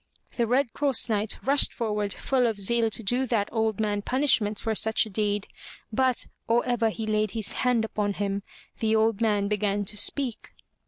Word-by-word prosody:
The 235 -2 0
Red 250 0 +1
Cross 275 -4 +1
Knight 210 0 -1
rushed 280 +1 +3
forward 210 -3 -2
full 255 +2 +1
of 225 - -1
zeal 230 +3 +2
to 225 - -3
do 245 +6 +1
that 220 -4 0
old 220 -2 0
man 205 -1 0
punishment 230 -4 +2
for 225 +1 -2
such 220 +1 +2
a 215 - -10
deed, 205 0 -1 0.5
but, 255 +1 +2 0.2
or 235 +1 +2
ever 240 -2 +1
he 220 0 -5
laid 215 0 0
his 215 -2 -3
hand 245 -3 +1
upon 210 -2 -2
him, 200 0 -2 0.4
the 220 0 +1
old 220 0 +2
man 205 -3 +2
began 205 -1 0
to 210 - -2
speak. 250 +2 -1
220 Hz, 190 wpm, -26 LUFS, 205-240 Hz, 0.5 s, rushed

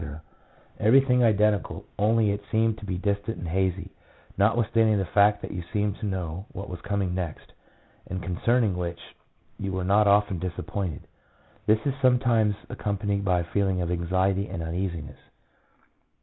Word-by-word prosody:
— - - -30
everything 125 +2 +5
identical, 105 -2 +2
only 110 0 +3
it 100 +1 -3
seemed 110 -1 +2
to 105 - -10
be 90 -1 -2
distant 100 +3 -2
and 85 - -6
hazy, 95 +2 -1 0.4
notwithstanding 110 +1 +3
the 95 - 0
fact 105 +2 +3
that - - -5
you 90 - -4
seemed 105 -2 0
to 110 - -3
know 95 -1 -4
what 100 +2 -6
was 90 -1 -7
coming 100 -2 -1
next, 90 -4 -5 0.5
and 95 0 -5
concerning 105 +3 +1
which 85 -1 -5 0.5
you 95 -1 -3
were 95 -1 -2
not 100 +3 +4
often 100 -2 +3
disappointed. 90 -1 -4 0.6
This 110 +4 +3
is 140 - +1
sometimes 120 -5 +3
accompanied 100 -1 -2
by 90 -2 +2
a 85 - -10
feeling 95 -2 +1
of 90 -1 -1
anxiety 95 +3 0
and 85 -3 -5
uneasiness. 85 -3 -4
100 Hz, 155 wpm, -26 LUFS, 90-105 Hz, 0.6 s, everything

